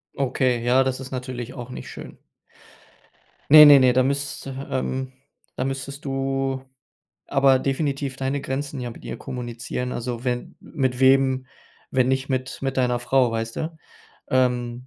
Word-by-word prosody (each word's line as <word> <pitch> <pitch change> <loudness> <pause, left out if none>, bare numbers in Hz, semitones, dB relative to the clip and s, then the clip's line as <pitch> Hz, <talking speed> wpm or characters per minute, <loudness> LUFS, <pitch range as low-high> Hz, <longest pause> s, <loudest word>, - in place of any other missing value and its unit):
Okay, 125 -3 0
ja, 125 +2 +4
das 130 0 -2
ist 130 0 -8
natürlich 125 -1 -5
auch 125 -2 -8
nicht 125 - -8
schön. - - -10 1.3
Ne, 150 0 +11
ne, 145 -1 +9
ne, 130 -1 +5
da 130 +1 +4
müsste, 135 0 -3
ähm 130 0 -2 0.4
da 130 - -2
müsstest 135 +1 -5
du 135 -1 -1 0.7
aber 135 -2 +4
definitiv 140 -1 -2
deine 135 +1 -2
Grenzen 140 +1 -4
ja 120 -1 -4
mit - - -13
ihr - - -5
kommunizieren. 125 0 -5
Also, 120 +1 -4
wenn 125 -1 +1
m - - -16
mit 130 -5 -2
wem, 130 0 +3 0.4
wenn 130 -1 +2
nicht 130 0 0
mit 130 0 -2
mit 135 0 -2
deiner 125 -1 +2
Frau, 125 0 +2
weißt 115 0 -3
du? 160 +1 -4 0.5
Ähm, 125 -1 0
130 Hz, 155 wpm, -23 LUFS, 125-135 Hz, 1.3 s, Ne